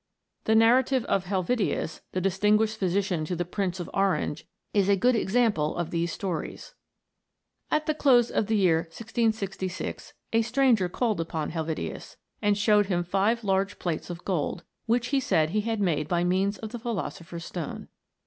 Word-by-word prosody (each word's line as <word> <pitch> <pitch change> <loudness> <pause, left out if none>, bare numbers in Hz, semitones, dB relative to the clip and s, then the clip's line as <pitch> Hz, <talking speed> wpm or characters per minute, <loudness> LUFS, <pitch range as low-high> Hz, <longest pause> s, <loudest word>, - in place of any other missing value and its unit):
The 220 - +3
narrative 245 +3 +4
of 190 - 0
Helvetius, 190 -2 -1
the 185 - -1
distinguished 210 +4 +2
phy 190 - +1
sician 185 -3 0
to 180 - -2
the 175 +1 -2
Prince 185 0 -2
of 175 - -4
Orange, 195 -6 0 0.3
is 200 -1 +3
a 200 - +6
good 245 +6 +3
example 210 -8 +1
of 175 -1 -2
these 170 0 -1
stories: 185 - -5 1.0
At 305 0 +1
the 310 - +1
close 250 -6 +4
of 210 - 0
the 220 -1 +2
year 180 -5 +4
1666 195 +1 -3 0.2
a 225 - +4
stranger 235 -5 +2
called 215 -2 0
upon 160 -2 -3
Helvetius, 160 - -4 0.2
and 205 -1 +2
showed 210 -1 +4
him 175 -3 0
five 200 +6 +1
large 195 0 0
plates 170 -1 -3
of 175 0 -7
gold, 175 -1 -1 0.2
which 240 +2 +1
he 275 0 +2
said 160 -11 +1
he 210 +2 +1
had 225 0 -2
made 155 -6 +1
by 175 +1 +1
means 190 +3 +1
of 220 -1 -7
the 240 - -5
philosopher's 180 -7 -5
stone. 170 -5 -6
195 Hz, 170 wpm, -27 LUFS, 175-225 Hz, 1.0 s, a